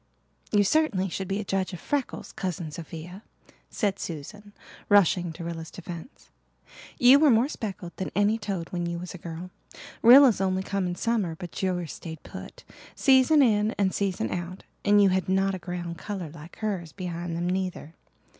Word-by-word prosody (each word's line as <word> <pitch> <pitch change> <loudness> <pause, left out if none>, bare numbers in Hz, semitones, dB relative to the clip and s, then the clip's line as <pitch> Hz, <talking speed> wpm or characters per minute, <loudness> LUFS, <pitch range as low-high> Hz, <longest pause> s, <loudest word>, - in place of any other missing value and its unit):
"You 205 -1 +4
certainly 200 -6 +2
should 190 +2 -4
be 195 +2 -1
a - - -2
judge 195 -1 -1
of 180 - -6
freckles, 285 - -3
Cousin 175 -4 -4
Sophia," 170 +4 -8 0.5
said 200 -3 -1
Susan, 200 +7 -7 0.4
rushing 185 -4 +4
to 170 - -8
Rilla's 165 -1 -5
defence. 175 - -10 0.7
"You 255 +3 +7
were 305 -1 +6
more 235 +1 +4
speckled 195 - -6
than 190 - -3
any 205 +2 +2
toad 195 -5 -4
when 175 -1 -2
you 170 0 -3
was 180 +1 -7
a 180 - -9
girl. 170 +2 -7 0.5
Rilla's 245 -3 +8
only 190 0 0
come 195 -2 -1
in 175 - -3
summer 210 -7 0
but 175 +1 -7
yours 180 -4 -1
stayed 160 -2 -9
put, - - -10 0.3
season 270 +2 +5
in 215 -2 +2
and 190 -2 +1
season 185 - -1
out; 175 +1 -5 0.2
and 205 0 +5
you 195 - +5
had 185 0 0
not 195 +1 +2
a 190 - -4
ground 175 -1 -5
colour 190 -7 -5
like 155 +1 -12
hers 195 -7 -3
behind 175 -2 -4
them 175 +1 -1
neither. 180 -4 -3
185 Hz, 175 wpm, -27 LUFS, 170-205 Hz, 0.7 s, Rilla's